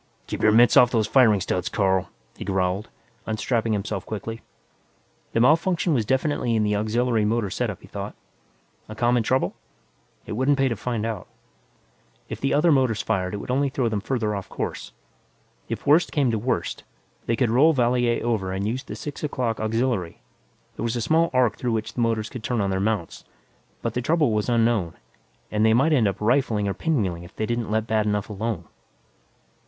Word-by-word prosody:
"Keep - - -5
your 110 - +5
mitts 120 +2 +5
off 125 - +7
those 115 -3 +1
firing 110 -3 +4
studs, 90 -1 -2
Carl," 95 -3 +1 0.3
he - - -7
growled, 95 +1 -1 0.4
unstrapping 110 +1 0
himself 100 -1 -3
quickly. 110 +2 -6 0.9
The - - +2
malfunction 165 +6 +3
was 115 -6 0
definitely 130 -3 0
in 110 - +2
the 105 0 +1
auxiliary 110 +2 +1
motor 105 -2 0
setup, - - -3
he - - -12
thought. - - -6 0.7
A 110 - -7
common 120 +2 +2
trouble? 130 +4 0 0.7
It - - -8
wouldn't 130 +6 +2
pay 135 -1 +2
to 115 - -1
find 115 +1 -3
out. 110 -5 -4 1.0
If - - -6
the 135 - 0
other 160 +4 +4
motors 125 -7 +2
fired, 95 +1 -1
it - - -3
would 100 - -5
only 140 +2 +1
throw 130 -3 0
them 105 -2 -2
farther 110 -2 -1
off 100 - -6
course. - - -5 0.8
If - - -4
worst 155 +5 +4
came 140 -5 +2
to 110 - -1
worst, 105 -7 -2 0.4
they 115 - +2
could 115 -1 +1
roll 140 +7 +5
Valier 120 -3 +1
over 105 -6 -1
and 95 +2 -2
use 125 +4 -2
the - - -7
six 145 0 -7
o'clock 125 -6 -1
auxiliary; 110 -5 -1 0.6
there - - -4
was 115 0 -1
a 120 - -1
small 165 +7 +2
arc 125 -4 +2
through 120 -2 -1
which 110 -1 -3
the 120 - -2
motors 115 -2 0
could 125 - -8
turn 120 0 -1
on 100 -1 0
their 95 - 0
mounts. 100 -4 -2 0.6
But 115 - -2
the 125 - -1
trouble 155 -1 +2
was 105 +2 0
unknown, 115 -7 +1 0.6
and 105 0 +1
they 110 0 +5
might 145 +6 +3
end 120 -8 +3
up 100 - -2
rifling 110 -3 +1
or 100 - 0
pinwheeling 100 - -1
if 85 - -14
they 110 - -1
didn't 120 -1 -2
let 110 0 0
bad 110 -1 +1
enough 105 0 -1
alone. 105 -3 -3
115 Hz, 195 wpm, -24 LUFS, 105-125 Hz, 1.0 s, off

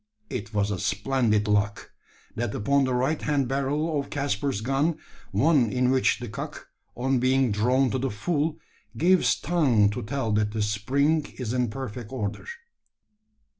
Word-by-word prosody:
It 115 -3 -4
was 105 -1 0
a 95 - -2
splendid 105 +1 +1
lock 105 0 0 0.4
that 115 -2 -2
upon 140 +6 +2
the 130 - -1
right 135 +5 0
hand 145 -3 0
barrel 145 +4 0
of 140 - -5
Caspar's 140 -4 -1
gun 135 +7 0 0.3
one 140 -7 +3
in 125 0 +2
which 130 0 +3
the 120 - -6
cock, 140 +7 -7 0.3
on 130 +1 +1
being 130 -1 +2
drawn 125 +5 +2
to 130 - -1
the 135 +1 -1
full, 150 +8 -1 0.4
gives 180 +2 +3
tongue 125 -12 +3
to - - -4
tell 115 +1 -2
that 105 0 +1
the 110 -1 0
spring 140 +9 +1
is 125 -3 -3
in 125 -2 +1
perfect 120 -2 -6
order. 105 -6 -4
130 Hz, 160 wpm, -26 LUFS, 105-140 Hz, 0.4 s, one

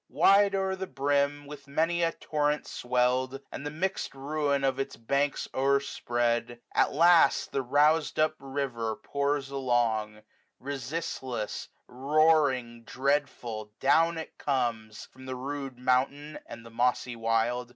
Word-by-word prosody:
Wide 200 0 +4
o'er 190 0 0
the 190 0 -5
brim, 145 0 0
with 140 -1 -11
many 165 +4 0
a 165 -1 +2
torrent 150 -2 -1
swellM, 125 +2 0
And - - -6
the 145 - -3
mixM 170 0 -3
ruin 140 0 -1
of 135 0 +1
its 135 - -3
banks 140 +5 -1
o - - -3
erspread^ 120 -4 +1
95 120 -1 -12
At - - +3
last 170 +2 +4
the 135 - -1
rousM 150 +5 +2
up 155 0 +2
river 135 -5 -3
pours 140 +1 -2
along; 115 -5 0 0.4
Resistless, 130 -4 -4 0.2
roaring, 135 -4 +2
dreadful, 125 -5 -2
down 165 +5 +3
it 160 - -8
comes, 115 -6 -2
From 130 0 -15
the 130 - -4
rude 135 0 -5
mountain, 135 +4 0
and 115 0 -10
the 115 - -12
mossy 125 +1 0
wild. 115 +2 0
135 Hz, 140 wpm, -28 LUFS, 125-150 Hz, 0.4 s, Wide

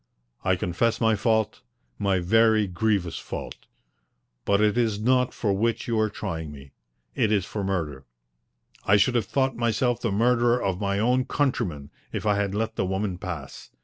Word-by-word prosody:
I 95 - +2
confess 90 +6 0
my 110 -1 +3
fault 110 0 0 0.4
my 100 -2 +2
very 110 +4 +3
grievous 95 -1 -1
fault. - - -7 0.8
But 100 0 +3
it 105 0 +3
is 115 -4 +1
not 125 +3 +3
that - - -21
for 105 -4 0
which 115 +3 0
you 115 -2 0
are 110 0 +2
trying 80 -7 -5
me. 70 -1 -12 0.4
It 110 - +1
is 100 -4 +2
for 105 - -4
murder. 80 -9 -3 0.8
I 105 - +4
should 115 +5 +3
have 115 -5 0
thought 135 +2 0
myself 120 +1 0
the 115 - -1
murderer 120 +3 +3
of 95 -3 -2
my 100 -1 0
own 125 +4 +2
countrymen 105 - -1 0.2
if - - -4
I 105 -1 +2
had 100 -1 -1
let 110 +1 -2
the - - +1
woman 95 -1 -2
pass. 85 -7 -7
105 Hz, 180 wpm, -25 LUFS, 95-115 Hz, 0.8 s, I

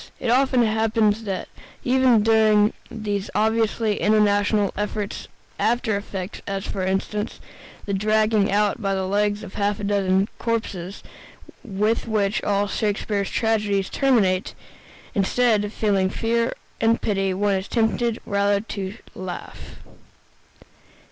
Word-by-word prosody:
It 245 -3 0
often 260 -1 +3
happens 220 0 +1
that 195 -2 -3 0.4
even 250 -3 +4
during 215 -1 +4 0.2
these 205 -3 -3
obviously 220 0 +1
intentional 205 -1 +3
efforts 210 0 -4 0.3
after 230 -2 +1
effect, 195 -2 -5
as, 195 -1 -3
for 190 - -3
instance, 200 +3 -2 0.5
the 200 - -3
dragging 215 0 +2
out 205 +1 +1
by 195 -1 0
the 190 0 -1
legs 205 +2 0
of - - -9
half 205 0 -1
a - - -6
dozen 195 -1 +2
corpses, 205 -5 -3 0.6
with 215 0 -1
which 210 -2 0
all 200 0 +1
Shakespeare's 205 -1 -1
tragedies 210 -4 0
terminate, 210 -9 +2 0.6
instead 215 +2 +2
of 205 - -4
feeling 200 -4 +1
fear 230 +3 0 0.3
and 225 +1 +3
pity, 195 -2 0
one 200 +2 +1
is 190 0 -2
tempted 230 0 0
rather 200 -1 +1
to 200 -2 -5 0.2
laugh. 180 -2 -8
210 Hz, 125 wpm, -23 LUFS, 200-225 Hz, 0.6 s, even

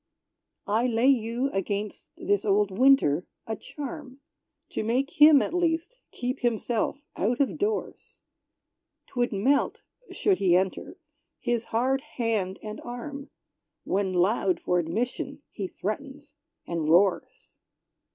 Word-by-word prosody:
I 220 +4 +1
lay 240 +2 +3
you, 245 +1 +1
against 200 +1 -3
this 205 -1 0
old 200 -1 +2
Winter, 230 - +4 0.2
a 220 - -3
charm. 285 0 -8 0.5
To - - -2
make 255 +7 -1
him, 300 -2 +9
at - - -4
least, 345 +7 0
keep 250 +2 -4
himself 240 +3 -1
out 235 +5 0
of 280 - 0
doors! 425 +1 -3 0.8
'Twould 245 -1 -1
melt 245 +8 +1 0.3
should 400 -2 +1
he 180 -2 +4
enter 190 - -2 0.4
his 240 -2 -1
hard 260 +4 0
hand 225 -9 -2
and 215 0 -6
arm. 275 +4 -7 0.5
When 195 0 0
loud 185 +1 +2
for 180 - +1
admission 245 - -3
he 195 -3 -4
threatens 280 +10 -6 0.3
and 165 -3 -2
roars. 180 +3 +1
235 Hz, 120 wpm, -27 LUFS, 200-275 Hz, 0.8 s, him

